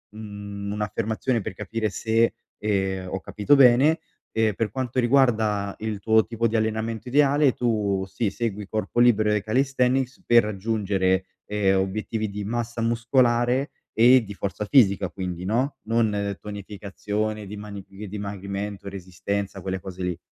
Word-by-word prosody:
mhmm, 100 -1 -6
un'affermazione 110 +3 -1
per 95 - -5
capire 110 +3 -3
se, 115 +3 +1 0.2
ehm, 95 -3 -1
ho 95 - -3
capito 105 +10 +2
bene, 135 +4 +6 0.3
ehm, 110 -2 +2
per 115 - -1
quanto 130 -1 -2
riguarda 110 -6 +2
il 110 -2 -3
tuo 110 +1 +3
tipo 115 +1 0
di 115 0 0
allenamento 110 +1 -2
ideale 140 +1 +4
tu 105 -5 0
sì 100 +2 -1
segui 105 -2 -3
corpo 110 +2 -2
libero 110 -3 +4
e 105 - +1
calisthenics 130 +3 +1
per 120 -1 +6
raggiungere, 95 -3 0 0.2
ehm, 100 -2 +2
obiettivi 110 +2 -2
di 100 0 -5
massa 120 +2 -3
muscolare 120 +3 +2 0.2
e 125 +3 +6
di 100 - -7
forza 100 +1 -4
fisica 100 -6 +4
quindi, 90 -2 -5
no, 125 +8 0
non 105 -4 0
tonificazione 105 +1 -4
dimani 100 -1 -8
di 100 +2 -9
dimagrimento, 100 0 -5
resistenza, 95 +1 -4
quelle 95 0 -3
cose 95 0 -7
lì? 90 -2 -2
105 Hz, 140 wpm, -25 LUFS, 100-115 Hz, 0.3 s, bene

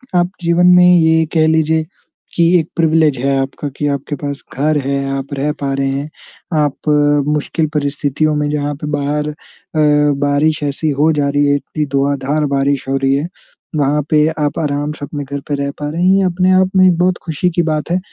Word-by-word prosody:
आप 175 0 +2
जीवन 170 +1 +3
में 180 0 +6
ये 160 0 +3
कह 160 -1 +3
लीजिए 160 0 +1 0.5
कि 170 -1 +3
एक 160 - -3
प्रिविलेज 160 -3 +2
है 135 +1 0
आपका 135 +2 -5
कि 145 - -1
आपके 140 +1 -3
पास 140 0 -5 0.2
घर 150 +2 +1
है, 140 0 -1
आप 135 0 -5
रह 140 +2 -1
पा 135 -1 -1
रहे 135 0 -1
हैं। 140 +3 -3 0.5
आप 145 +1 -1 0.4
मुश्किल 150 +2 -1
परिस्थितियों 145 +1 -1
में, 150 0 -1
जहाँ 145 0 -2
पे 150 +1 -7
बाहर 145 +1 -1
अ, 150 - -6 0.9
बारिश 145 +2 +1
ऐसी 145 +2 -2
हो 160 +2 +4
जा 145 -2 0
रही 145 +1 +1
है, 145 - +3
इतनी 150 +1 -3
धुआँधार 140 +2 0
बारिश 140 -1 0
हो 135 - +1
रही 135 0 +1
है। 145 +4 -2 0.5
वहाँ 145 +1 +1
पे 150 0 +3
आप 145 -1 -1
आराम 145 -1 -2
से 145 - -7
अपने 145 0 -6
घर 140 +1 -5
पे 145 - -1
रह 140 0 -2
पा 145 - -3
रहे 165 +3 -4
हैं। 190 +1 +4
ये 195 - +2
अपने-आप 185 +1 +2
में 185 -1 +5
बहुत 180 0 +1
खुशी 170 +2 -1
की 175 - +3
बात 155 +2 -3
है 180 - +2
150 Hz, 200 wpm, -16 LUFS, 140-160 Hz, 0.9 s, में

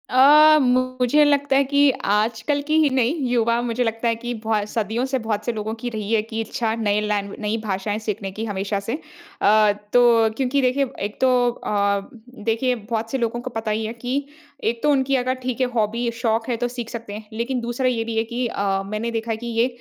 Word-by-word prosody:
अ, 300 +4 +7
मुझे 255 +2 +2
लगता 285 -1 +2
है 275 - +5
कि 285 +1 +4 0.2
आज 220 +2 +1
कल 290 -1 +1
की 310 +1 +2
ही 300 - +4
नहीं, 260 0 +1 0.2
युवा 235 -1 +2
मुझे 240 0 -1
लगता 225 0 -1
है 230 - +2
कि 240 +1 -5
बहु 215 -2 +1
सदियों 225 +3 -1
से 265 0 -1
बहुत 220 -2 -3
से 240 - 0
लोगों 220 0 -4
की 245 - -1
रही 215 -2 -5
है 220 - +4
कि 225 +1 -4
इच्छा, 225 0 -2
नए 210 -2 +1
लैंवे 205 -1 -2
नई 215 +1 -1
भाषाएंँ 205 +1 -2
सीखने 210 -3 -4
की, 215 +4 -5
हमेशा 200 -1 -2
से। 200 +3 -4 0.5
अ, 215 0 +5 0.2
तो 235 -2 +5
क्योंकि 270 +1 +1
देखिए, 260 +2 +2
एक 205 +1 -4
तो 260 - +5 0.2
अ, 200 -3 -1 0.4
देखिए, 250 +3 +1
बहुत 225 0 -4
से 270 - 0
लोगों 240 -1 -2
को 255 - -5
पता 225 -2 -3
ही 220 +1 -1
है 220 - -4
कि 255 +4 -3 0.4
एक 230 +1 -1
तो 295 - +3
उनकी 270 -1 +2
अगर, 255 0 +1
ठीक 255 0 -2
है, 255 - +3
हॉबी 230 +2 0
शौक 230 -1 -1
है, 240 - +1
तो 245 +1 -1
सीख 240 -2 -6
सकते 230 -4 -7
हैं। 215 +1 -8
लेकिन 240 +3 -2
दूसरा 240 +2 -1
ये 235 -3 0
भी 230 0 -4
है 225 - +3
कि 240 +2 -3
अ, 195 -3 -1
मैंने 215 +3 -3
देखा 225 0 -3
है 220 - -1
कि 240 +2 -7
ये 230 +1 +2
230 Hz, 225 wpm, -22 LUFS, 215-255 Hz, 0.5 s, अ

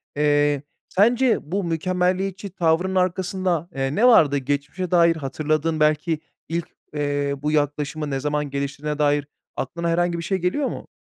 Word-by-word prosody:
Eee, 145 -1 +2 0.3
sence 235 +5 +3
bu 200 +1 0
mükemmeliyetçi 185 +3 -1
tavrının 180 +1 +1
arkasında, 180 -2 0
eee, 135 +1 -1
ne 240 +4 +5
vardı? 150 - +6
Geçmişe 145 +6 -3
dair 170 -2 +5
hatırladığın 155 +2 -1
belki 155 +1 +2 0.3
ilk, 170 0 -2 0.3
eee, 145 -1 -1
bu 150 +1 0
yaklaşımı 150 0 -1
ne 135 - -1
zaman 150 +1 -1
geliştirdiğine 140 +2 -3
dair 145 -1 +2 0.3
aklına 170 +5 -3
herhangi 175 0 +1
bir 170 - -4
şey 190 +1 0
geliyor 185 +11 0
mu? - - -6
160 Hz, 145 wpm, -23 LUFS, 145-180 Hz, 0.3 s, vardı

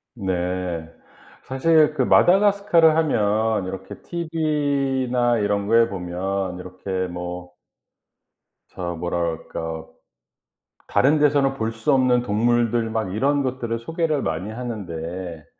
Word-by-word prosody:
네. 90 -4 -3 0.5
사실 155 +3 +3
그 - - +1
마다가스카르 195 -3 +4
하면 110 - +2
이렇게 95 +1 -7
티브이나 140 -7 0
이런 100 -1 0
거에 115 +1 +5
보면 95 0 -3
이렇게 95 +1 -4
뭐 90 0 -6 1.2
저 85 -1 -5
뭐라 85 +1 -2
그럴까. 80 -1 -4 1.0
다른 145 +4 +3
데서는 140 -2 +3
볼 115 -3 -2
수 115 +6 0
없는 130 -2 +3
동물들 115 +1 +1
막 110 -4 -2
이런 140 +6 +1
것들을 125 -3 -2
소개를 160 +1 -1
많이 80 +6 -3
하는데 90 -8 -6
115 Hz, 235 characters per minute, -22 LUFS, 90-135 Hz, 1.2 s, 거에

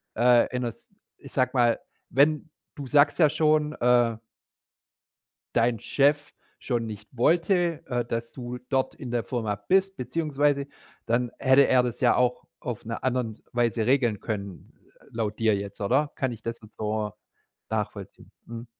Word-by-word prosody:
Äh, 120 +1 +5
in 125 - -1
'ner 120 - -1
s - - -15 0.3
ich - - -13
sage 130 0 +2
mal, 120 -3 +3 0.3
wenn 150 +4 +2 0.3
du 140 -2 -7
sagst 145 +5 +4
ja 155 -3 +6
schon, 150 0 +2
äh 120 -4 +3 1.4
dein 115 -1 +2
Chef 145 +4 +1 0.3
schon 120 -3 -2
nicht 105 -1 -8
wollte, 170 +3 +2
äh, 120 -2 -1
dass 115 0 -4
du 125 -1 -6
dort 130 -1 0
in 125 - -7
der 120 -1 0
Firma 110 -5 -2
bist 190 - +1
beziehungsweise 145 0 0 0.4
dann 120 +1 0
hätte 135 +1 +5
er 125 -1 +4
das 120 -2 -3
ja 125 - +4
auch 125 0 +1 0.2
auf 120 -4 -6
'ner 115 +1 -5
anderen 125 -4 -1
Weise 120 -2 +1
regeln 120 -5 +2
können 100 -4 -6 0.4
laut 110 -2 -3
dir 110 -2 +3
jetzt, 100 0 -6
oder? 135 +9 +1
Kann 130 -2 -1
ich 110 - -9
das 115 0 -3
jetzt 105 - -16
so 105 0 -2 0.6
nachvollziehen? - - -5
Mhm. 115 +1 -8
125 Hz, 160 wpm, -26 LUFS, 115-140 Hz, 1.4 s, ja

